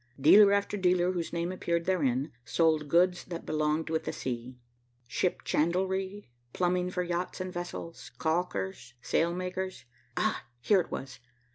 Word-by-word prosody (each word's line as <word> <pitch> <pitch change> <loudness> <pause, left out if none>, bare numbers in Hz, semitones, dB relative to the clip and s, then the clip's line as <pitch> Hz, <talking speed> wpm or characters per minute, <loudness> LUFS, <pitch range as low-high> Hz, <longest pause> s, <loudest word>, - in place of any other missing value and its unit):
Dealer 200 +8 +8
after 200 +1 +1
dealer, 180 -1 +3
whose 175 -3 -3
name 170 +1 -1
appeared 170 -2 -1
therein, 140 -6 +1
sold 155 +2 +2
goods 175 +2 +3
that 170 -2 -6
belong 155 +1 0
with 160 0 -2
the - - -1
sea. 125 0 -5 0.5
Ship 120 +10 -1
chandlery, 190 +5 0 0.3
plumbing 180 0 +1
for 180 0 -1
yachts 175 +2 -3
and 185 0 -4
vessels, 175 -1 -6
calkers, 125 - -2
sailmakers. 185 -1 -1 0.3
Ah, - - 0
here 195 - +4
it - - -9
was! 135 0 -6
175 Hz, 140 wpm, -30 LUFS, 155-185 Hz, 0.5 s, Dealer